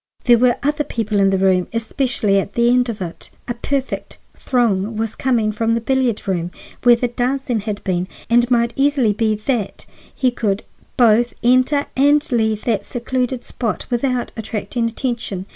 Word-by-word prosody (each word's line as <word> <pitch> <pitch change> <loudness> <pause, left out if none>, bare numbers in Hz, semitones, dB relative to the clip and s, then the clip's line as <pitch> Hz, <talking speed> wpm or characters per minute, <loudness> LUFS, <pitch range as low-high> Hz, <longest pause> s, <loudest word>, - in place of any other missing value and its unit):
"There 240 -2 +5
were 245 0 +4
other 295 +1 +1
people 220 -6 -2
in 195 0 +4
the 195 - +1
hall, 185 -1 +2
especially 230 -3 0
at 195 - -5
my 235 - +3
end 245 +1 +3
of 210 -4 -4
it. 170 -1 -8 0.2
A 240 - -1
perfect 265 +2 -3 0.2
throng 220 -4 0
was 225 0 -2
coming 235 -5 +1
from 225 +2 0
the - - 0
billiard 250 -3 0
room, 175 -3 -1 0.3
where 240 -1 +6
the 245 +1 -1
dancing 250 0 -1
had 205 0 -5
been, 180 -2 -1 0.2
and 240 +1 +4
it 240 - -3
might 235 -1 +2
easily 275 -6 +2
be 215 0 +1
that 215 -1 -3 0.3
he 255 -2 +2
could 205 -4 -1 0.3
both 235 0 +4
enter 255 +4 +3
and 290 +2 +3
leave 220 -3 +1
that 215 -4 0
secluded 250 +1 -2
spot 230 -4 -3
without 245 0 -1
attracting 225 +1 -3
attention. 230 -6 -3
235 Hz, 175 wpm, -19 LUFS, 215-250 Hz, 0.3 s, where